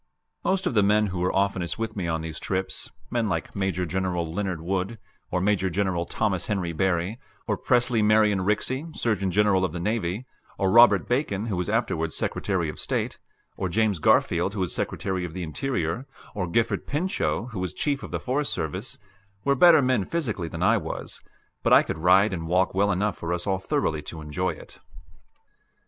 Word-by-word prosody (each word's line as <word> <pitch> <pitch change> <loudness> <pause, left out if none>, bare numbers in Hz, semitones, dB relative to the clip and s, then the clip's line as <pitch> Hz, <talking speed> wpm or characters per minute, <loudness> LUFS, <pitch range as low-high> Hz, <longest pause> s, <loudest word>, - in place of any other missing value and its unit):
Most 190 0 +1
of - - 0
the 105 - +4
men 105 +2 +4
who 90 - -3
were 90 +1 +1
oftenest 95 -3 0
with 115 -1 -3
me 95 -4 -2
on 80 -1 -1
these 80 -1 -6
trips 95 0 -3 0.2
men 115 -3 0
like - - -3
Major 95 -2 -1
General 90 0 -1
Leonard 95 -3 -2
Wood; 95 +6 -2 0.3
or 90 - 0
Major 95 -1 +2
General 90 -2 -1
Thomas 95 -3 -1
Henry 95 -5 -1
Barry; 95 +5 0 0.3
or - - 0
Presley 120 -2 +2
Marion 105 -1 +4
Rixey, 125 - 0
Surgeon 105 -5 0
General 100 0 +3
of 90 - -1
the 90 - -4
Navy; 105 +2 -1 0.3
or 95 -1 +1
Robert 120 +2 +6
Bacon, 120 -6 0
who 110 -4 -2
was 90 0 -2
afterwards 80 0 0
Secretary 95 -5 -1
of 75 - -6
State; - - -2 0.4
or 95 - -2
James 105 -1 +1
Garfield, 90 +6 +3
who 100 - -2
was 90 - -1
Secretary 95 -2 -2
of 85 -1 -6
the 90 - -3
Interior; 100 - -2 0.3
or 95 -3 -2
Gifford 115 +6 0
Pinchot, 145 -6 -1
who 105 - -5
was 90 -2 -2
chief 140 - -1
of - - -7
the - - -3
Forest 140 +3 -1
Service 80 -2 -4 0.5
were 140 - +4
better 160 +1 +7
men 130 -5 +2
physically 115 - -2
than - - -4
I - - +5
was; - - -5 0.4
but - - +3
I - - +8
could 80 - -4
ride 95 +4 +5
and 80 -2 -4
walk 90 +2 +2
well 100 +2 +2
enough 100 +2 -1
for 85 - -3
us 90 0 -2
all 95 -1 0
thoroughly 80 -4 -1
to 80 +2 -8
enjoy 75 +5 -2
it. - - -13
95 Hz, 190 wpm, -25 LUFS, 90-110 Hz, 0.5 s, I